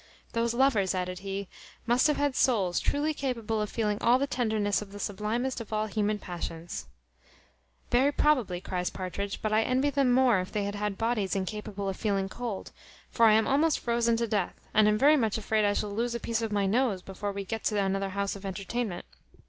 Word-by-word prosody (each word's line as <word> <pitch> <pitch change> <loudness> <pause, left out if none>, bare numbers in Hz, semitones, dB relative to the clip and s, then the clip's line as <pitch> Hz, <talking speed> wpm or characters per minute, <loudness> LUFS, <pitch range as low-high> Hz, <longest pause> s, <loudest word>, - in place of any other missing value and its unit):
"Those 230 0 0
lovers," 225 -8 +3
added 180 0 -3
he, 195 0 -4 0.4
"must 240 +4 +4
have 300 - +1
had 285 -2 0
souls 195 -11 +2
truly 300 +2 0
capable 230 -6 -2
of 210 - -2
feeling 210 -3 -1
all 240 +2 +5
the 275 - 0
tenderness 220 -7 0
of 205 -2 -9
the 205 - -8
sublimest 220 +6 -2
of 225 - -10
all 215 0 0
human 210 0 0
passions." 170 - -6 1.0
"Very 260 +4 +4
probably," 255 -13 +2
cries 180 -1 -2
Partridge: 195 +2 -5
"but 215 0 0
I 215 - +4
envy 260 +5 +1
them 275 -2 +2
more, 245 -5 +4
if 185 - -4
they 210 - -1
had 205 0 -3
bodies 225 -5 0
incapable 200 +1 -4
of 195 - -3
feeling 195 -3 0
cold; 235 -2 -5 0.4
for 230 -1 +5
I 215 - +6
am 220 +1 +4
almost 300 +3 +3
frozen 235 -1 +1
to 235 - 0
death, 205 -4 -1 0.2
and 215 0 +5
am 210 0 +3
very 295 +6 +6
much 225 -5 +1
afraid 215 0 +1
I 205 - +3
shall 205 0 -2
lose 235 +3 -1
a - - -2
piece 230 0 -1
of 225 -1 -2
my 205 -1 +1
nose 210 -2 +1
before 200 +1 -4
we 200 0 -5
get 225 +3 -4
to 210 -2 +1
another 195 0 0
house 200 +1 -2
of 200 - -10
entertainment. 195 +1 -3
215 Hz, 205 wpm, -29 LUFS, 195-240 Hz, 1.0 s, I